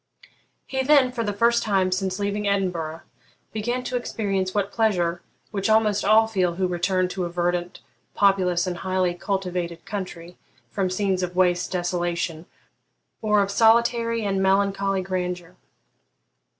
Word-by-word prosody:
He 265 0 -2
then, 265 -2 +4
for 240 -2 -3
the 205 - -1
first 235 +3 +2
time 190 -3 +1
since 185 0 -1
leaving 205 0 -2
Edinburgh, 175 -5 -1 0.5
began 240 +4 -2
to 250 - -4
experience 200 -6 -1
that 200 0 -1
pleasure 180 -7 +1 0.3
which 200 0 -1
almost 215 -2 +3
all 215 +2 +5
feel 185 -6 0
who 185 +1 0
return 180 +1 0
to 180 -1 -3
a - - -4
verdant, 175 0 -2 0.3
populous, 185 -3 +3
and 180 -1 -3
highly 185 -1 0
cultivated 180 -2 -3
country 180 -4 -6 0.3
from 190 -2 -1
scenes 190 0 0
of 180 0 -3
waste 180 -1 +2
desolation 175 -2 -2 0.7
or 210 -2 +3
of 200 - -3
solitary 230 +1 +3
and 195 -1 0
melancholy 195 0 +1
grandeur. 180 -1 -4
190 Hz, 140 wpm, -24 LUFS, 180-210 Hz, 0.7 s, all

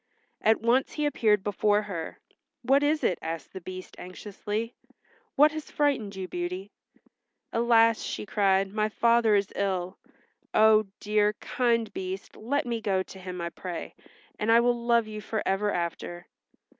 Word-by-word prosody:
At 220 +1 +4
once 240 +3 +2
he 300 - -1
appeared 215 -8 +2
before 205 +1 +2
her. 180 -6 -6 0.5
"What 270 +3 +4
is 300 +1 +1
it?" 180 - +1
asked 165 -2 -5
the 190 - -7
Beast 185 +1 -8
anxiously. 210 +4 -5 0.6
"What 300 +2 +6
has 310 -1 -7
frightened 265 -9 0
you, 190 -1 -5
Beauty?" 180 +3 -4 0.8
"Alas," 230 -1 +4
she - - -4
cried, 195 -1 +2
"my 215 0 +1
father 230 -1 +3
is 200 -1 0
ill. 185 -2 -2 0.6
Oh, 215 -1 +6
dear, 210 0 +2
kind 230 0 0
Beast 190 +1 -6
let 270 +6 -1
me 235 -2 -2
go 190 -3 +1
to 190 - -12
him 180 -1 -7
I 170 0 -3
pray, 180 -1 -6 0.5
and 215 +2 +1
I 230 - +7
will 240 0 +3
love 235 -1 +4
you 215 0 -7
for 215 +1 -3
ever 205 +2 +1
after." 175 0 -4
210 Hz, 155 wpm, -27 LUFS, 190-230 Hz, 0.8 s, I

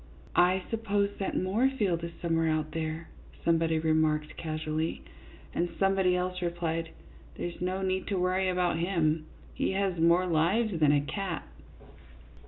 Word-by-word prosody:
" - - -22 0.2
I 190 0 -1
suppose 205 -3 0
that 195 - -1
Moorfield 200 -3 +1
is 170 - -4
somewhere 165 -1 +2
out 155 -1 0
there," 160 0 -4 0.4
somebody 165 -1 +3
remarked, 155 -1 +1
casually, 155 - -3 0.5
and 175 +1 0
somebody 195 -2 +3
else 180 0 -2
replied, 165 -1 -2 0.2
" - - -22
There 175 - -3
's - - -14
no 185 +1 -1
need 190 0 -1
to 200 - -1
worry 185 +1 +1
about 180 -2 +1
him, 160 -3 +1 0.3
he - - -1
has 190 -3 0
more 170 +2 +4
lives 180 +4 +1
than 150 -2 +5
a 145 -1 +4
cat." 180 +3 -4
175 Hz, 155 wpm, -29 LUFS, 160-190 Hz, 0.5 s, than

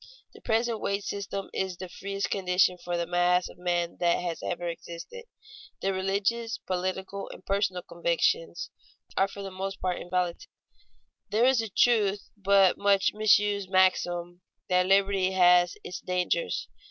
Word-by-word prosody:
The - - -15
present 230 0 0
wage 200 0 -1
system 195 -1 -5
is 190 -2 -2
the 185 - -6
freest 195 +2 -4
condition 180 -1 +2
for 175 0 -2
the 170 - -1
mass 175 +1 +2
of - - -14
men 175 -1 -1
that 175 -1 +3 0.2
ever 175 - -3
has - - 0
existed. 465 - -9 0.6
Their 195 0 +1
religious, 200 +5 -1
political, 185 +2 -4
and - - -12
personal 195 -3 0
convictions, 170 - -1 0.4
are 195 - +3
for 200 0 -9
the 195 - -6
most 190 +1 -5
part 180 -1 -2
inviolate. 180 -1 -2 0.8
There 225 +3 +3
is 260 -2 +4
a 225 - -5
true 205 -1 +3 0.2
but 195 -2 +4
much 200 -1 +3
misused 205 -2 +3
maxim 175 -2 +1 0.3
that 180 0 +3
liberty 195 -1 +3
has 180 -1 +5
its 180 - -6
dangers. 180 - -1
190 Hz, 150 wpm, -28 LUFS, 180-200 Hz, 0.8 s, has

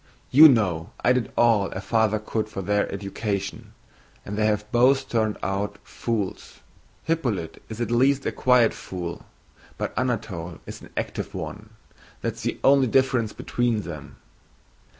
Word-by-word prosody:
"You 155 +4 +10
know 90 - +1
I 125 - +4
did 125 -2 -1
all 110 -5 +4
a - - -6
father 110 +1 +1
could 110 0 -3
for 95 -2 -5
their 105 +2 0
education, 100 0 -4 0.5
and 100 - -5
they 105 +1 +2
have 105 -1 0
both 130 +3 +4
turned 110 -2 0
out 100 +1 -2
fools. 110 -5 -4 0.4
Hippolyte 120 - -2
is 110 0 -7
at 120 0 -2
least 135 +3 +3
a - - 0
quiet 125 -3 +4
fool, 85 -2 -7 0.5
but - - -3
Anatole 100 -9 -2
is - - -9
an - - -13
active - - -4
one. 105 +1 -6 0.5
That - - -1
is - - -11
the - - -2
only 135 -1 +5
difference 125 -3 +2
between 120 -2 -1
them." 75 -7 -8
110 Hz, 150 wpm, -24 LUFS, 100-120 Hz, 0.5 s, You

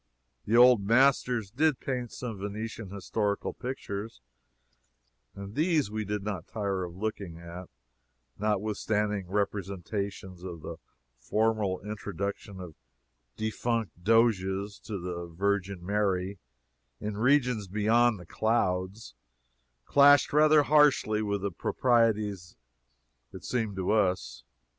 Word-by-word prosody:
The 115 +3 +2
old 125 -4 +7
masters 120 -2 +3
did 150 +3 +2
paint 125 -3 -3
some 115 -5 -6
Venetian 105 +1 -5
historical 100 +1 -2
pictures, 115 - -6 1.2
and 100 0 -8
these 155 - +1
we 110 0 -3
did 105 0 -3
not 100 -5 -4
tire 100 -4 -2
of 85 -1 -10
looking 100 -5 -4
at, 85 +2 -9 0.7
notwithstanding 105 -1 -1
representations 100 -1 -3
of 85 -3 -7
the - - -6 0.4
formal 110 - 0
introduction 100 -1 -5
of 90 -3 -8 0.6
defunct 110 -3 -2
doges 100 -2 +2
to 105 - -4
the 85 -1 -5
Virgin 95 +1 -2
Mary 100 -1 0 0.6
in 105 0 -4
regions 125 -3 +2
beyond 110 +3 +2
the 90 - -11
clouds 95 - -1 0.7
clashed 145 0 +6
rather 155 0 +6
harshly 145 -8 +4
with 100 -2 -2
the 100 - -1
proprieties, 105 -3 +1 0.8
it - - -9
seemed 110 -5 -2
to 95 0 -1
us. 95 - 0
105 Hz, 110 wpm, -29 LUFS, 95-115 Hz, 1.2 s, old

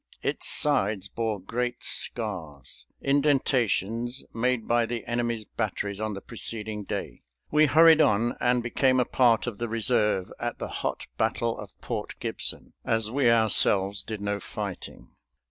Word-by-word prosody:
Its - - +1
sides 105 -9 +3
bore 110 -1 -3
great 120 +6 -3
scars, 85 - -1 0.2
indentations 130 -4 +1
made 120 0 0
by 120 0 +3
the 115 -1 -4
enemy's 120 -2 -2
batteries 100 -2 -3
on 110 -1 -2
the 100 - -7
preceding 110 -3 -4
day. - - -5 0.3
We 155 0 +5
hurried 160 +2 +6
on 120 -4 +2
and 125 -1 +2
became 130 +2 +2
a 125 - +2
part 120 -3 +3
of 120 -5 -5
the 120 -1 -3
reserve 105 -4 +1
at - - -3
the - - -5
hot - - -4
battle 115 -1 0
of 105 -2 -11
Port - - -5
Gibson, - - -4
as 110 -1 0
we 130 -2 +3
ourselves 100 -3 +4
did 110 +1 -6
no 100 0 -2
fighting. - - -7
115 Hz, 145 wpm, -26 LUFS, 105-125 Hz, 0.3 s, hurried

